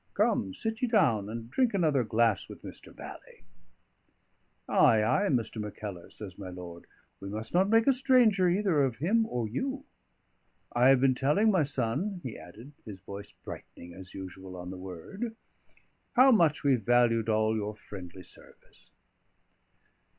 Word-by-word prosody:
Come, 95 -1 +1
sit 225 0 -3
ye 250 - +2
down, 130 - +2
and 115 +1 -6
drink 245 - +1
another 155 -8 +2
glass 110 -2 +1
with - - -11
Mr. - - -11
Bally." - - -12 1.2
"Ay, 110 -1 +4
ay, 155 - +2
Mr. 115 -4 -1
Mackellar," 105 -3 -7
says 95 -3 -10
my 95 -2 -7
lord, 90 -1 -10 0.3
"we 100 - -7
must 110 +2 -6
not 190 +3 +3
make 225 +1 +4
a 275 - +5
stranger 240 -8 +4
either 180 -4 +2
of 130 -4 +1
him 210 - +1
or 120 - -2
you. 265 - -4 0.9
I 125 +2 +5
have 135 -2 +5
been 135 -1 +4
telling 150 +12 +2
my 185 -4 +3
son," 145 - -1
he 125 - -6
added, 110 - -12
his 100 -4 -9
voice 100 +2 -9
brightening 85 0 -10
as 95 +1 -12
usual 95 0 -8
on 90 0 -7
the 95 - -7
word, 95 - -7 0.8
"how 260 +2 +7
much 165 - +3
we 140 -3 +4
valued 115 0 +2
all 110 0 +2
your 105 0 -3
friendly 95 -3 -10
service." - - -15
120 Hz, 160 wpm, -29 LUFS, -, 1.2 s, how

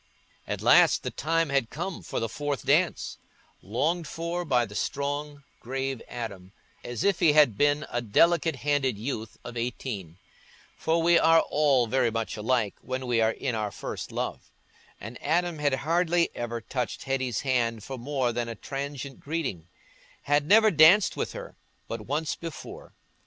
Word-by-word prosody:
At - - -4
last - - +6
the - - -3
time 165 +1 0
had 140 -4 +1
come 175 +3 -5
for - - -4
the 115 - -1
fourth 145 +3 -4
dance—longed 155 - -1
for 170 +3 -3
by 125 -7 +2
the 105 - -11
strong, 145 +4 -3 0.2
grave 135 0 -3
Adam, 100 -6 -7 0.3
as 120 -2 -4
if 200 -3 +2
he 165 -4 +5
had 145 -8 +5
been 145 +4 +2
a 120 - -2
delicate 165 +8 +3
handed 140 -6 +1
youth 110 -1 -5
of 120 - -8
eighteen; 115 -7 -4 0.6
for 165 +1 0
we 170 0 +5
are 165 0 +6
all 140 -4 +2
very 125 +1 +2
much 115 0 -3
alike 110 -1 0
when 130 0 -4
we 120 -2 +1
are 110 - +4
in 130 - -3
our 110 -2 -1
first - - -6
love; - - -4 0.5
and 115 +4 -9
Adam 170 +1 0
had 145 -2 +2
hardly 170 +1 +2
ever 120 -1 -4
touched 125 -1 -4
Hetty's 130 -4 -1
hand 115 -5 0
for 135 - -6
more 130 -1 -1
than 120 0 -2
a 115 - -5
transient 140 +2 -6
greeting—had 145 - -4
never 215 +2 +6
danced 170 +5 +6
with - - -3
her - - -8 0.3
but 115 -2 -6
once 150 +4 -1
before. 165 -4 -9
135 Hz, 160 wpm, -27 LUFS, 115-155 Hz, 0.6 s, last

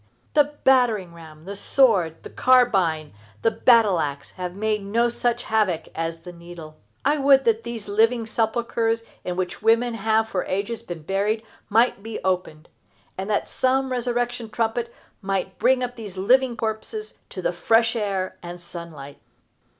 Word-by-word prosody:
The 295 0 +3
battering 230 -9 +3
ram, 160 -1 -13
the 200 +1 -6
sword, 195 - +2
the - - -9
carbine, 195 - +3 0.3
the 225 - +4
battle 225 -4 +4
axe 140 -2 -3
have 180 -1 -6
made 215 +1 -1
no 230 +4 +1
such 240 0 -1
havoc 205 -7 0
as 165 0 -4
the 180 - -9
needle. 170 -2 -11 0.3
I 295 +2 +2
would 275 -1 +5
that 225 -1 +2
these 230 -3 -6
living 225 +3 +2
sepulchres 230 0 0 0.2
in 180 - -3
which 180 -1 -3
women 230 +2 +3
have 220 0 +1
for 185 -4 -2
ages 200 +5 -3
been 175 -8 -8
buried 205 +6 0 0.3
might 225 -1 +3
be 225 +1 -6
opened, 180 -4 -2 0.5
and 190 +2 -5
that 205 - 0
some 265 0 0
resurrection 245 -2 -2
trumpet 230 +1 -1 0.3
might 190 -1 -3
bring 255 0 +3
up 245 0 -4
these 210 -5 -9
living 245 +5 +3
corpses 230 - -4 0.2
to - - -7
the - - 0
fresh 230 +1 +2
air 195 -4 -2
and 175 0 -8
sunlight. 170 -5 -10
220 Hz, 160 wpm, -23 LUFS, 180-235 Hz, 0.5 s, would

